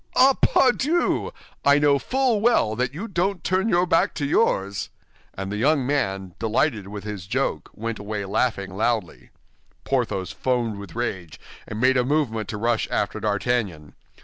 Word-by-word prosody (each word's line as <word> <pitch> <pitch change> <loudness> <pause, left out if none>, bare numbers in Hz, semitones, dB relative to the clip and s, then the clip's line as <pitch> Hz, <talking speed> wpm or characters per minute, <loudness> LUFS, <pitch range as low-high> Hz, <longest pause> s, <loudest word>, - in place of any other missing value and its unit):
"Ah, 270 +1 +6
pardieu! 270 +7 +2 0.3
I 140 0 +5
know 145 -1 +4
full 255 - +1
well 220 - +3
that 125 +2 -1
you 180 +11 -6
don't 190 -2 -1
turn 190 +4 +1
your 175 -2 +3
back 165 - +2
to 145 - -2
yours." 100 - +1 0.5
And 95 0 -5
the 105 - -2
young 140 +3 +2
man, 95 -10 -1
delighted 110 -1 0
with 100 0 -7
his 105 -4 -6
joke, - - -1
went 115 0 -4
away 105 0 -4
laughing 100 -2 -1
loudly. 110 -3 -1 0.5
Porthos 115 -8 -1
foamed 120 -5 -1
with 100 +1 -10
rage, 95 -9 -4 0.3
and 110 - -5
made 130 +2 +4
a 125 - +3
movement 125 -6 0
to 105 - -4
rush 115 +1 0
after - - -1
D'Artagnan. 100 -7 -1
120 Hz, 160 wpm, -24 LUFS, 100-150 Hz, 0.5 s, Ah